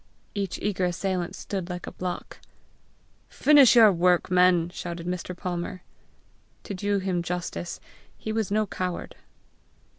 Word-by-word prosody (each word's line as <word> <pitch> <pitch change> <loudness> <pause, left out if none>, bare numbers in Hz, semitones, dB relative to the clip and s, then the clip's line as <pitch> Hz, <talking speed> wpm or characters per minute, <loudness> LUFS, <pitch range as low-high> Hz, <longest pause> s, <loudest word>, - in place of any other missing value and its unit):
Each 200 -3 -3
eager 190 -3 0
assailant 180 0 -2
stood 190 -3 -5
like 180 -1 -5
a - - -7
block. 180 -1 -6 0.9
"Finish 285 -4 +6
your 225 -3 +8
work, 180 0 +2
men!" 180 -1 +4
shouted 170 -1 -6
Mr. 180 0 -4
Palmer. 180 0 -4 0.8
To - - -6
do 205 +2 0
him 185 -2 -1
justice, 175 0 -4 0.4
he 220 - -5
was 220 -2 -1
no 215 +1 +1
coward. 185 -2 -4
180 Hz, 130 wpm, -26 LUFS, 175-200 Hz, 0.9 s, your